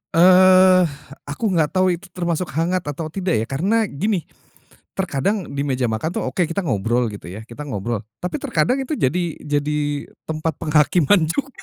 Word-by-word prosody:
Eh, 185 Hz, +1 st, +7 dB, 0.4 s
aku 190 Hz, +9 st, -2 dB
nggak 160 Hz, -4 st, +2 dB
tahu 185 Hz, 0 st, +4 dB
itu 195 Hz, -, -14 dB
termasuk 175 Hz, -1 st, -1 dB
hangat 170 Hz, +3 st, +1 dB
atau 155 Hz, +2 st, -4 dB
tidak 185 Hz, 0 st, -1 dB
ya -, -, -4 dB
karena 195 Hz, -, +1 dB
gini, 195 Hz, +1 st, -1 dB, 0.7 s
terkadang 190 Hz, +2 st, -1 dB
di 140 Hz, 0 st, -2 dB
meja 130 Hz, -3 st, 0 dB
makan 110 Hz, +8 st, -2 dB
tuh -, -, -2 dB
oke 175 Hz, +6 st, 0 dB
kita 165 Hz, +5 st, -2 dB
ngobrol 120 Hz, -, 0 dB
gitu 105 Hz, -1 st, -10 dB
ya, 95 Hz, +5 st, -8 dB
kita 120 Hz, +6 st, -9 dB
ngobrol, 110 Hz, -3 st, -3 dB, 0.2 s
tapi 180 Hz, +11 st, -3 dB
terkadang 260 Hz, -2 st, 0 dB
itu 270 Hz, +3 st, -3 dB
jadi 170 Hz, -, 0 dB
jadi 150 Hz, 0 st, -1 dB, 0.5 s
tempat 160 Hz, 0 st, -1 dB
penghakiman 160 Hz, +3 st, +3 dB
juga. 270 Hz, -, -2 dB
165 Hz, 165 wpm, -21 LUFS, 140-185 Hz, 0.7 s, Eh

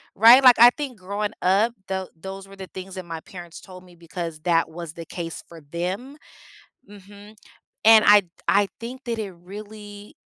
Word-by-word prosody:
Right? 235 Hz, +5 st, +7 dB
Like, 250 Hz, -3 st, +7 dB
I 240 Hz, +1 st, +10 dB
think 265 Hz, -8 st, -6 dB
growing 205 Hz, +3 st, -4 dB
up, 205 Hz, +6 st, +2 dB
tho 190 Hz, -1 st, -4 dB
those 195 Hz, +2 st, -9 dB
were 195 Hz, -, -14 dB
the 190 Hz, -1 st, -9 dB
things 190 Hz, 0 st, -9 dB
that 185 Hz, -2 st, -7 dB
my 165 Hz, -1 st, -7 dB
parents 175 Hz, -2 st, -11 dB
told 185 Hz, -1 st, -13 dB
me 180 Hz, -1 st, -18 dB
because 170 Hz, -1 st, -7 dB
that 165 Hz, -1 st, +1 dB
was 165 Hz, -1 st, -9 dB
the 165 Hz, -1 st, -9 dB
case 165 Hz, 0 st, -7 dB
for 165 Hz, -2 st, -14 dB
them. 185 Hz, -, -5 dB, 0.7 s
Mhm. 205 Hz, +1 st, -15 dB, 0.5 s
And 220 Hz, -1 st, +8 dB
I 205 Hz, -1 st, +7 dB, 0.2 s
I 200 Hz, 0 st, +3 dB
think 250 Hz, +3 st, -8 dB
that 230 Hz, -1 st, -3 dB
it 200 Hz, -3 st, -5 dB
really 205 Hz, +3 st, -12 dB
195 Hz, 180 wpm, -23 LUFS, 175-215 Hz, 0.7 s, I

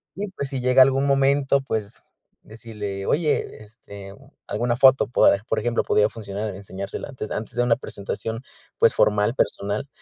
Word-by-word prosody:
Y, 205 Hz, +2 st, -4 dB
pues, 140 Hz, -7 st, -5 dB
si 130 Hz, -2 st, -3 dB
llega 125 Hz, +1 st, +6 dB
algún 135 Hz, +1 st, +1 dB
momento, 140 Hz, 0 st, +2 dB
pues 110 Hz, -5 st, -4 dB, 0.4 s
decirle, 105 Hz, -3 st, -7 dB
oye 150 Hz, -7 st, -1 dB
este 100 Hz, -2 st, -12 dB, 0.3 s
alguna 120 Hz, +3 st, -1 dB
foto 130 Hz, +1 st, +5 dB
por 105 Hz, -3 st, +3 dB
por -, -, 0 dB
ejemplo, 120 Hz, -1 st, 0 dB
podría 105 Hz, 0 st, +2 dB
funcionar 105 Hz, -1 st, -6 dB
enseñársela 100 Hz, 0 st, -7 dB
antes 125 Hz, -6 st, -7 dB
antes 110 Hz, -, -5 dB
de 120 Hz, -, +2 dB
una 120 Hz, -1 st, +2 dB
presentación, 110 Hz, 0 st, -5 dB, 0.4 s
pues, -, -, +5 dB
formal, 105 Hz, +1 st, +2 dB
personal. 105 Hz, +5 st, -1 dB
115 Hz, 155 wpm, -23 LUFS, 105-135 Hz, 0.4 s, llega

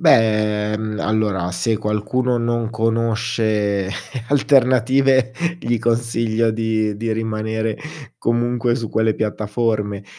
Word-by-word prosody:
Beh, 105 Hz, -7 st, +3 dB
mh, 110 Hz, -1 st, -4 dB
allora 105 Hz, -4 st, 0 dB
se 110 Hz, +5 st, 0 dB
qualcuno 110 Hz, +4 st, 0 dB
non 120 Hz, -1 st, -1 dB
conosce 110 Hz, -3 st, 0 dB, 0.4 s
alternative 130 Hz, -1 st, +3 dB, 0.3 s
gli 120 Hz, -6 st, 0 dB
consiglio 115 Hz, -1 st, +1 dB
di 110 Hz, -2 st, 0 dB
di 115 Hz, +1 st, -2 dB
rimanere 110 Hz, 0 st, -2 dB, 0.4 s
comunque 120 Hz, 0 st, 0 dB
su 115 Hz, -3 st, -4 dB
quelle 110 Hz, 0 st, +1 dB
piattaforme, 105 Hz, -1 st, -1 dB
110 Hz, 100 wpm, -20 LUFS, 105-120 Hz, 0.4 s, Beh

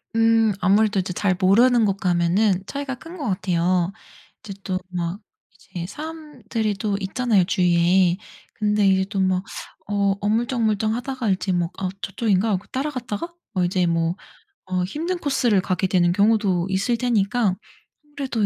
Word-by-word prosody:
음. 225 Hz, -1 st, +4 dB
아무래도 205 Hz, +2 st, +3 dB
이제 180 Hz, 0 st, -3 dB
잘 185 Hz, 0 st, +1 dB
모르는 230 Hz, +6 st, +4 dB
곳 195 Hz, -1 st, 0 dB
가면 185 Hz, +2 st, +2 dB
차이가 280 Hz, +3 st, -4 dB
큰 330 Hz, +8 st, -11 dB
것 290 Hz, -6 st, -4 dB
같아요. 180 Hz, -1 st, +1 dB, 0.5 s
이제 205 Hz, -, -7 dB
또 185 Hz, -1 st, -2 dB
막 175 Hz, +1 st, -3 dB, 0.5 s
이제 170 Hz, -1 st, -4 dB
사람들이 255 Hz, -, -4 dB
또 200 Hz, +1 st, -2 dB
있잖아요 210 Hz, 0 st, +1 dB
주위에. 175 Hz, 0 st, +3 dB, 0.4 s
근데 210 Hz, -1 st, +1 dB
이제 190 Hz, 0 st, +3 dB
또 200 Hz, -2 st, -3 dB
막 185 Hz, -1 st, +1 dB, 0.5 s
어 200 Hz, -1 st, +1 dB
어물쩍어물쩍하다가 225 Hz, +2 st, 0 dB
이제 190 Hz, 0 st, 0 dB
뭐 175 Hz, -1 st, 0 dB
'아 190 Hz, -, -2 dB
저쪽인가?' 205 Hz, 0 st, 0 dB
하고 195 Hz, 0 st, -1 dB
따라갔다가 265 Hz, +1 st, -4 dB, 0.2 s
뭐 185 Hz, -3 st, +1 dB
이제 180 Hz, 0 st, +1 dB
뭐 165 Hz, 0 st, 0 dB, 0.6 s
어 180 Hz, -1 st, +1 dB
힘든 325 Hz, -, -3 dB
코스를 255 Hz, -, +1 dB
가게 185 Hz, 0 st, -1 dB
되는 175 Hz, -2 st, +3 dB
경우도 200 Hz, -3 st, +2 dB
있을 195 Hz, +5 st, +1 dB
테니까 230 Hz, -3 st, +1 dB, 0.5 s
아무래도 270 Hz, -7 st, -2 dB
200 Hz, 315 characters per minute, -22 LUFS, 185-230 Hz, 0.6 s, 음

